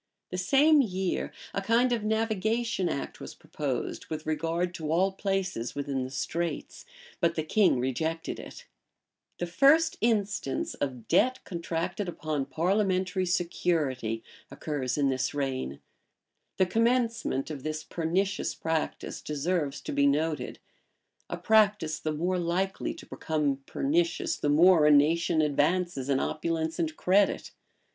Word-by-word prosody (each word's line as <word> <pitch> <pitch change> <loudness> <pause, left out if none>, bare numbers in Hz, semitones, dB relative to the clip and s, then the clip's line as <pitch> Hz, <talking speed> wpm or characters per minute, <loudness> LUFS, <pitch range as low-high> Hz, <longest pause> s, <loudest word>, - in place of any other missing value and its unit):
[] - - -58
The 185 - -3
same 285 - +5
year 190 -6 -2 0.2
a 195 - -1
kind 235 +5 +3
of 235 -3 0
navigation 220 -2 0
act 140 - -4
was - - -8
proposed 135 -5 -4
with 155 0 -5
regard 165 +3 -1
to 155 -3 -4
all 185 +4 +3
places 190 - -2
within 140 -2 -2
the 130 - -5
Straits; 165 +5 -3 0.3
but 170 -2 +2
the 155 - -1
king 185 -4 +3
rejected 160 +6 -2
it.[] - - -10 0.7
The 175 - -2
first 280 - +4
instance 205 - 0
of 125 -5 -4
debt 255 +1 +2
contracted 170 +3 -3
upon 155 -5 -3
parliamentary 185 +3 +1
security 155 - 0 0.3
occurs 135 -2 -3
in 140 -2 +2
this 130 +2 -1
reign.[] 130 - -2 0.8
The 185 - +4
commencement 230 - +1
of 145 -3 -6
this 155 +2 -4
pernicious 185 +4 -1
practice 160 -1 -3
deserves 150 -2 -2
to - - -5
be 140 0 +3
noted; 150 +2 0 0.7
a - - -3
practice 210 -7 +3
the 155 - -2
more 175 +4 0
likely 180 +3 -1
to - - -11
become 150 -3 -1
pernicious, 335 +3 0
the 145 - -1
more 160 +1 +6
a - - +6
nation 160 +2 +4
advances 150 -1 0
in 135 -1 +3
opulence 160 +1 -2
and 160 -2 -1
credit. 195 +2 +2
170 Hz, 135 wpm, -28 LUFS, 150-195 Hz, 0.8 s, more